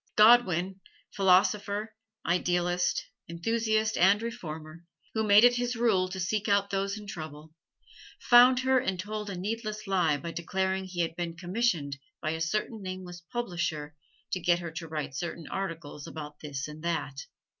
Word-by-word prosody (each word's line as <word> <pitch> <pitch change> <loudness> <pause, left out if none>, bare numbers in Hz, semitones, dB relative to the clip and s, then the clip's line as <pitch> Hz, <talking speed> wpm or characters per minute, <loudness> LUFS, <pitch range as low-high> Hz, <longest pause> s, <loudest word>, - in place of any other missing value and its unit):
Godwin, 195 -5 +5 0.4
philosopher, 200 +3 +2 0.3
idealist, 175 0 +1 0.2
enthusiast 220 +5 0
and 195 +4 +6
reformer, 170 -8 -7 0.3
who 220 - 0
made 210 +1 +7
it 245 0 +6
his 245 0 -1
rule 215 -6 +2
to 190 0 -5
seek 210 +4 -1
out 200 -1 +2
those 195 +1 -1
in 210 - -9
trouble, 155 -4 -8 0.7
found 250 +1 +7
her 260 0 +3
and 190 -8 -2
told 210 +2 -4
a 190 - -5
needless 215 +2 -4
lie 180 -7 +2
by 170 +2 -6
declaring 190 +3 -1
he 180 -2 -3
had 165 -1 -2
been 170 -1 -4
commissioned 175 -7 -1 0.2
by 155 - -2
a 160 0 -4
certain 215 +6 -1
nameless 185 -2 -7
publisher 175 -10 -3 0.4
to 185 - 0
get 175 0 +3
her 170 -2 -6
to 165 +1 -6
write 155 -3 -4
certain 165 +3 -5
articles 165 -6 -5
about 150 -1 -8
this 140 -2 -5
and 150 +1 -10
that. 145 -5 -2
185 Hz, 155 wpm, -29 LUFS, 165-215 Hz, 0.7 s, made